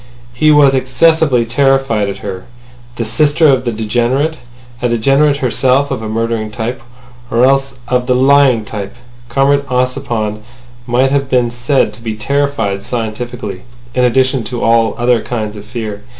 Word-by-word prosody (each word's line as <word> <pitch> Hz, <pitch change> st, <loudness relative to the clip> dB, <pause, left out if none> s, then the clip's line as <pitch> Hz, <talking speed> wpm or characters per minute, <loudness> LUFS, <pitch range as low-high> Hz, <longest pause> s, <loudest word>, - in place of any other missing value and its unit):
He 155 Hz, +5 st, +2 dB
was 145 Hz, -2 st, +5 dB
excessively 135 Hz, -1 st, +2 dB
terrified 130 Hz, -4 st, +1 dB
at 100 Hz, +1 st, -7 dB
her—the 120 Hz, +4 st, -9 dB
sister 150 Hz, +8 st, +2 dB
of 130 Hz, -2 st, +2 dB
the 120 Hz, -, 0 dB
degenerate—a 120 Hz, +2 st, -2 dB
degenerate 135 Hz, +5 st, +2 dB
herself 135 Hz, +1 st, +1 dB
of 130 Hz, -, -3 dB
a 110 Hz, -, -5 dB
murdering 115 Hz, 0 st, -2 dB
type... 120 Hz, +3 st, -4 dB, 0.5 s
or 120 Hz, +2 st, +3 dB
else 135 Hz, 0 st, +1 dB
of 125 Hz, -1 st, 0 dB
the 125 Hz, -, +2 dB
lying 130 Hz, -3 st, +4 dB
type. 100 Hz, -3 st, -6 dB, 0.3 s
Comrade 140 Hz, +3 st, +2 dB
Ossipon 125 Hz, -4 st, -2 dB, 0.5 s
might 130 Hz, +2 st, +2 dB
have 140 Hz, -1 st, 0 dB
been 125 Hz, -2 st, +1 dB
said 125 Hz, +3 st, 0 dB
to 120 Hz, -, -14 dB
be 110 Hz, -2 st, -4 dB
terrified 140 Hz, -5 st, -1 dB
scientifically 115 Hz, -3 st, -5 dB, 0.3 s
in 125 Hz, -, +1 dB
addition 130 Hz, +1 st, +2 dB
to 120 Hz, -1 st, -4 dB
all 115 Hz, -1 st, +2 dB
other 120 Hz, -1 st, +2 dB
kinds 110 Hz, -3 st, -4 dB
of 105 Hz, 0 st, -10 dB
fear. 110 Hz, -3 st, -6 dB
125 Hz, 150 wpm, -14 LUFS, 115-135 Hz, 0.5 s, was